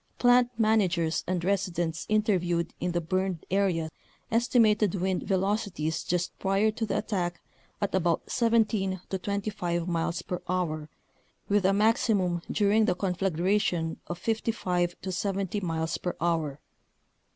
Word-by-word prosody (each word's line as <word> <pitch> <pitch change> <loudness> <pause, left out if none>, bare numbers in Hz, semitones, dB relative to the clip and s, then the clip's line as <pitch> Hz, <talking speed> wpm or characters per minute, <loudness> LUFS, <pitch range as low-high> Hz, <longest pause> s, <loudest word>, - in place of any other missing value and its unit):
Plant 245 0 +5
man 220 -1 +4
agers 170 -4 0
and 180 -1 -1
residents 175 -4 -1
interviewed 180 -6 +1
in 180 +1 -1
the 175 - 0
burned 185 +1 -2
area 180 -5 +1 0.4
estimated 225 -4 +3
wind 185 0 0
velocities 190 -5 -1
just 175 0 -1
prior 195 +3 +2
to 225 +1 -3
the - - 0
attack 175 -4 -2 0.4
at 205 - -1
about 175 -3 +1
17 220 -5 +1
to 190 - -1
25 185 -4 -2
miles 170 0 -1
per 180 - -4
hour 155 -4 -1 0.6
with 205 -1 +3
a - - +4
maximum 200 -4 +2
during 210 +1 +3
the 180 - +1
conflagration 180 -2 0
of 175 - -4
55 180 -4 -1
to 190 - -3
70 195 +1 -1
miles 160 -3 -2
per 180 - -3
hour. 160 -4 0
185 Hz, 135 wpm, -28 LUFS, 175-205 Hz, 0.6 s, Plant